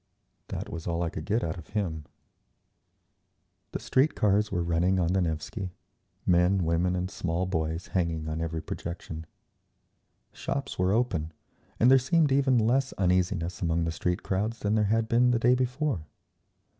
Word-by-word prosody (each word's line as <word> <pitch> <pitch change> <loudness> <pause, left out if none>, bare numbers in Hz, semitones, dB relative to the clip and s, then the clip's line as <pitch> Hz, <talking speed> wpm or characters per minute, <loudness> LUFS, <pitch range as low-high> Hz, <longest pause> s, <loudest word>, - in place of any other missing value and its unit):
That - - -5
was 85 0 -6
all 85 0 0
I 85 - -2
could 75 - -6
get 110 +2 +1
out 80 +1 -3
of 80 - -12
him…. 85 -8 -3 1.7
The - - -3
street 135 +4 +2
cars 105 0 +2
were 90 -3 0
running 85 +3 +2
on 85 0 +1
the 95 - +2
Nevsky, 90 +3 -3 0.5
men, 90 +1 +3
women 85 +2 +1
and 90 0 -1
small 85 +1 -1
boys 80 -2 -2
hanging 85 -4 -1
on 80 +1 -3
every 80 -1 -3
projection. 80 -2 -6 1.0
Shops 140 -8 -4
were 90 +1 +3
open, 95 -9 0 0.5
and 125 +3 +6
there 135 - +8
seemed 150 +3 +2
even 135 -2 +4
less 130 +4 +2
uneasiness 90 -1 0
among 85 -1 +1
the 80 - -1
street 90 +2 -2
crowds 105 +5 -1
than 105 -1 -1
there 110 -1 +3
had 110 +2 +1
been 120 +2 +4
the 125 - +3
day 120 +2 +4
before. 125 - -1
90 Hz, 165 wpm, -28 LUFS, 85-115 Hz, 1.7 s, there